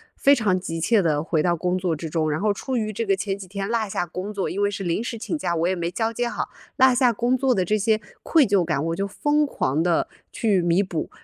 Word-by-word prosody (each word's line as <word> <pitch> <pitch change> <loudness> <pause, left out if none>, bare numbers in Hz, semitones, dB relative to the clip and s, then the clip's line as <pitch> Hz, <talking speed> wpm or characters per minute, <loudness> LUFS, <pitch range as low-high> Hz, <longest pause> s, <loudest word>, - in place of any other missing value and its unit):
非 280 +1 +5
常 205 -6 +1
急 165 -2 -5
切 210 +5 +3
地 155 -3 +1
回 160 -2 0
到 175 +1 +2
工 180 +2 0
作 180 -3 -1
之 160 +2 -6
中， 155 -1 0
然 155 +3 -1
后 205 0 +2
出 255 +4 -3
于 215 -1 -2
这 230 +3 -2
个 195 -1 +2
前 195 0 -2
几 195 - -9
天 195 +1 -4
落 225 -3 -1
下 175 - -1
工 185 +5 -6
作， 195 - -2
因 200 - -3
为 205 - +3
是 200 -1 -5
临 175 +6 -1
时 235 -1 -4
请 275 - -3
假， 175 -12 -1
我 165 +2 +1
也 185 - +1
没 170 -1 -2
交 225 +4 -1
接 240 +1 -1
好， - - -3 0.3
落 260 -1 +6
下 245 -1 +4
工 240 +3 +1
作 260 -1 +2
的 185 -1 +1
这 215 +4 +1
些 220 +1 +2 0.2
愧 315 -5 +4
疚 200 -4 +2
感， 160 -3 -1
我 165 0 -1
就 195 +2 -2
疯 295 +8 +1
狂 150 - -1
地 175 -2 +1 0.2
去 205 -5 +1
弥 175 +3 +2
补。 170 -4 -4
195 Hz, 295 characters per minute, -23 LUFS, 175-230 Hz, 0.3 s, 落